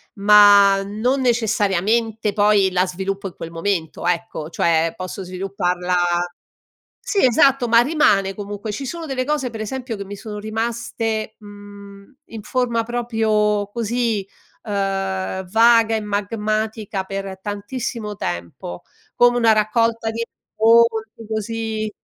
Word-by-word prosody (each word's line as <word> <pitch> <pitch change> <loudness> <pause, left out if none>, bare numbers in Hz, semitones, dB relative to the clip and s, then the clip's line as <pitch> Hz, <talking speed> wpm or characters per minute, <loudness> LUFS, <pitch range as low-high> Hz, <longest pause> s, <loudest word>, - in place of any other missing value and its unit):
ma 200 -1 +6
non 225 +7 -1
necessariamente 220 -2 +1
poi 205 -2 +3
la 185 +1 +1
sviluppo 195 +2 -4
in 185 - -11
quel 165 - -8
momento, 165 -1 -3
ecco, 170 -3 -2
cioè 165 -1 +1
posso 185 +1 -6
svilupparla 180 -1 -2 1.1
Sì, 400 - 0
esatto, 255 +1 +4
ma 230 0 +6
rimane 240 -9 +2
comunque. 205 +2 -6
Ci 270 +6 -5
sono 335 +4 -5
delle 265 -3 -2
cose, 285 -3 -1
pre 225 -1 -6
esempio, 250 +1 -5
che 200 - -6
mi 200 +1 -8
sono 210 +1 -7
rimaste, 225 0 -3
mhmm, 205 +2 -13
in 225 -2 -9
forma 235 0 -1
proprio 220 -3 0
così, 230 -2 -1 0.4
uhm, 195 -2 -2
vaga 225 +1 +5
e - - -2
magmatica 210 0 -2
per 195 0 -6
tantissimo 210 +2 -5
tempo, 85 - -5 0.3
come 245 0 +4
una 230 -2 +4
raccolta 225 +1 +1
di 230 +1 -3
racconti, 225 -1 +1
così 220 0 -3
210 Hz, 125 wpm, -20 LUFS, 195-230 Hz, 1.1 s, ma